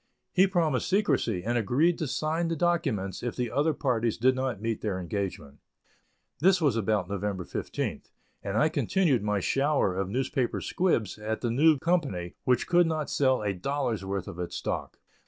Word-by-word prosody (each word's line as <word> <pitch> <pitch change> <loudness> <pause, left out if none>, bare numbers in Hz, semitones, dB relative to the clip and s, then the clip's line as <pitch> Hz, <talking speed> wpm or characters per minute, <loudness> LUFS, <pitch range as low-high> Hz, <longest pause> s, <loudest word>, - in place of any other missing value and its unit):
He 190 +1 +5
promised 165 -8 0
secrecy, 185 - +1
and 120 +3 0
agreed 145 - +2
to 155 - -1
sign 160 +5 -1
the 165 - -1
documents 145 - 0
if 120 -1 -3
the 125 -2 -2
other 150 +3 +2
parties 120 -5 0
did 130 +3 +4
not 130 -5 -2
meet 115 0 -2
their 100 -4 -2
engagement. 90 -6 -4 0.8
This 185 +4 +4
was 145 -8 +2
about 105 -4 0
November 100 -1 -3
15th, - - -4 0.3
and 100 +1 -3
I 120 - +4
continued 150 - +1
my 105 0 0
shower 135 -3 +1
of 95 0 -2
newspaper 130 +2 -1
squibs 115 - 0
at 110 +1 -3
the 120 - 0
new 150 +5 +5
company, 135 - -1
which 125 -2 +2
could 175 -1 +4
not 155 -2 -2
sell 130 -5 +2
a 100 -1 0
dollar's 120 +1 -2
worth 95 -1 -3
of 85 - -8
its 90 - -4
stock. - - -4
125 Hz, 175 wpm, -28 LUFS, 100-155 Hz, 0.8 s, He